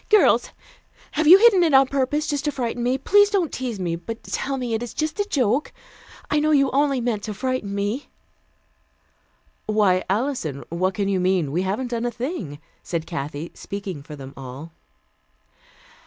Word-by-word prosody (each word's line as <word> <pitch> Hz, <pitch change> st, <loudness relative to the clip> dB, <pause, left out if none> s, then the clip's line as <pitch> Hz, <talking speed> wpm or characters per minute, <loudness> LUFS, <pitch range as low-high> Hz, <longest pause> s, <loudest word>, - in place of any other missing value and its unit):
"Girls 425 Hz, -1 st, +4 dB, 0.6 s
have 310 Hz, 0 st, 0 dB
you 360 Hz, +4 st, +11 dB
hidden 415 Hz, -3 st, +6 dB
it 320 Hz, -5 st, +4 dB
on 270 Hz, 0 st, +7 dB
purpose, 280 Hz, +3 st, 0 dB
just 290 Hz, -1 st, -2 dB
to 295 Hz, -, +1 dB
frighten 245 Hz, -3 st, -3 dB
me? 250 Hz, +2 st, +1 dB
Please 410 Hz, +9 st, +4 dB
don't 380 Hz, -7 st, 0 dB
tease 245 Hz, -5 st, -4 dB
me, 170 Hz, -2 st, -1 dB
but 225 Hz, +7 st, -7 dB
tell 275 Hz, 0 st, -3 dB
me 245 Hz, -3 st, -3 dB
it 220 Hz, -, -1 dB
is 240 Hz, -, -6 dB
just 310 Hz, +4 st, -2 dB
a 410 Hz, -, 0 dB
joke. 255 Hz, -, +1 dB, 0.6 s
I 300 Hz, -, +1 dB
know 305 Hz, +1 st, +1 dB
you 275 Hz, -3 st, +3 dB
only 275 Hz, -1 st, +2 dB
meant 230 Hz, -3 st, -1 dB
to 210 Hz, -2 st, -5 dB
frighten 250 Hz, -4 st, -2 dB
me!" 205 Hz, +7 st, -2 dB, 1.6 s
"Why, 205 Hz, -4 st, +3 dB
Alison, 200 Hz, -, -1 dB
what 185 Hz, +3 st, -1 dB
can 200 Hz, 0 st, -1 dB
you 195 Hz, -2 st, +1 dB
mean? 180 Hz, -5 st, +1 dB
We 170 Hz, +5 st, 0 dB
haven't 205 Hz, +7 st, -2 dB
done 235 Hz, 0 st, -1 dB
a -, -, 0 dB
thing," 240 Hz, -, -5 dB, 0.2 s
said 165 Hz, -2 st, -3 dB
Kathy, 150 Hz, -1 st, -5 dB
speaking 195 Hz, -6 st, -6 dB
for 150 Hz, +1 st, -10 dB
them 135 Hz, -1 st, -10 dB
all. 135 Hz, +5 st, -9 dB
235 Hz, 180 wpm, -23 LUFS, 185-280 Hz, 1.6 s, you